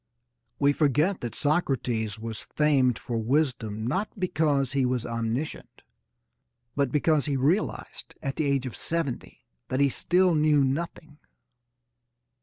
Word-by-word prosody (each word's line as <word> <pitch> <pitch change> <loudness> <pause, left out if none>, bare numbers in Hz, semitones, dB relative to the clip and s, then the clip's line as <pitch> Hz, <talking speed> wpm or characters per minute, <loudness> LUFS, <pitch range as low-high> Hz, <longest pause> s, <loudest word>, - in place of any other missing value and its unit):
We 145 0 +3
forget 155 +6 +2
that 120 -2 -5
Socrates 125 - 0
was 110 -1 -5
famed 135 -6 +2
for 115 -2 -3
wisdom 115 -4 0
not 190 - -1
because 150 -7 +1
he 135 -1 +2
was 125 -2 0
omniscient 115 +5 -4 0.9
but 140 -3 +1
because 150 +1 +2
he 140 -2 0
realised 155 +11 -1
at 135 -2 -4
the 155 - 0
age 140 -2 +1
of 125 - -5
seventy 165 -7 -4 0.2
that 130 - -1
he 140 0 +4
still 180 +6 +2
knew 150 -2 +4
nothing. 150 +2 -3
140 Hz, 130 wpm, -27 LUFS, 125-155 Hz, 0.9 s, he